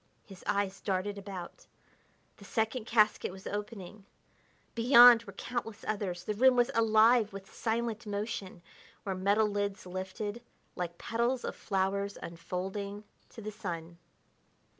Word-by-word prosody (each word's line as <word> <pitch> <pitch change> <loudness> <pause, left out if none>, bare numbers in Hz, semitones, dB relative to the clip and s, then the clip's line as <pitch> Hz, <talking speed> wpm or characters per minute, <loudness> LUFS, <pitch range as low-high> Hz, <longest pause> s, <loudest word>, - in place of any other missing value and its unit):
His 195 -2 -13
eyes 200 -1 0
darted 200 +1 -2
about; 190 -3 -8 0.7
the - - -14
second 220 +1 -1
casket 215 -4 +3
was 190 +1 -12
opening; 205 -1 -6 0.7
beyond 240 0 +8
were 200 - -10
countless 225 +1 -5
others; 195 -4 -2
the 210 - -2
room 255 +4 +5
was 245 -1 +3
alive 225 0 +5
with 195 0 -10
silent 230 0 -2
motion 200 -3 -4 0.4
where 195 - -2
metal 200 +4 +2
lids 205 -1 -2
lifted 190 +5 -5 0.3
like 175 -2 -4
petals 235 +2 -1
of - - -4
flowers 200 0 -1
unfolding 195 +4 -5 0.3
to 225 - -11
the 215 - -4
sun. 170 -5 -6
205 Hz, 130 wpm, -31 LUFS, 190-225 Hz, 0.7 s, beyond